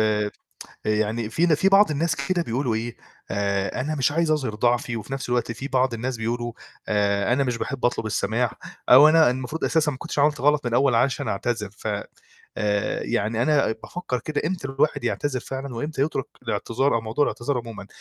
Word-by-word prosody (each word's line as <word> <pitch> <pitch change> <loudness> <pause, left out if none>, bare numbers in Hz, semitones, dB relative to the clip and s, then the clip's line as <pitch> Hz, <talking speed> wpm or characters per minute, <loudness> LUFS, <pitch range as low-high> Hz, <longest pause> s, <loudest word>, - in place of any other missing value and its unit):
آآ 105 -1 +1 0.5
يعني 110 +1 0
في 165 +9 +2
ن 165 - +4
في 190 +6 +3
بعض 195 -1 +6
الناس 155 +2 0
كده 170 +6 0
بيقولوا 125 -3 -1
إيه: 115 +2 -3 0.3
"آآ 100 +2 -1
أنا 150 +4 -1
مش 140 -2 +1
عايز 165 +1 +1
أظهِر 135 -8 0
ضعفي،" 120 +2 +1
وفي 110 +4 -7
نَفْس 135 -2 -4
الوقت 120 -1 0
في 130 +5 -6
بعض 130 -2 +1
الناس 125 +2 -3
بيقولوا: 120 +1 -2 0.4
"آآ، 100 +1 +1
أنا 140 +3 +2
مش 125 -2 -1
باحب 130 +2 -4
أطلب 120 -2 +1
السَماح 110 +2 0 0.4
أو 140 +5 +9
أنا 160 -3 +6
المفروض 130 +5 -3
أساسًا 160 -2 +2
ما - - -7
كنتش 170 -1 -5
عملت 150 0 +3
غلط 145 +1 +3
من - - +2
الأول 130 +2 +3
عشان 125 +3 +2
أنا - - 0
أعتذر،" 105 0 -2
ف 105 - -11 0.7
آآ 105 -1 0
يعني 110 +3 0
أنا 145 -3 +3
بافكّر 130 -8 -4
كده 150 +4 -3
إمتى 170 -5 -3
الواحد 140 +1 0
يعتذر 140 -3 -1
فعلًا 135 0 -6
وإمتى 145 +3 -2
يترُك 140 -3 -1 0.2
الإعتذار 115 +4 0
أو 115 - +1
موضوع 115 +6 -1
الإعتذار 125 +1 -2
عمومًا، 115 -4 -8
125 Hz, 195 wpm, -24 LUFS, 115-145 Hz, 0.7 s, أو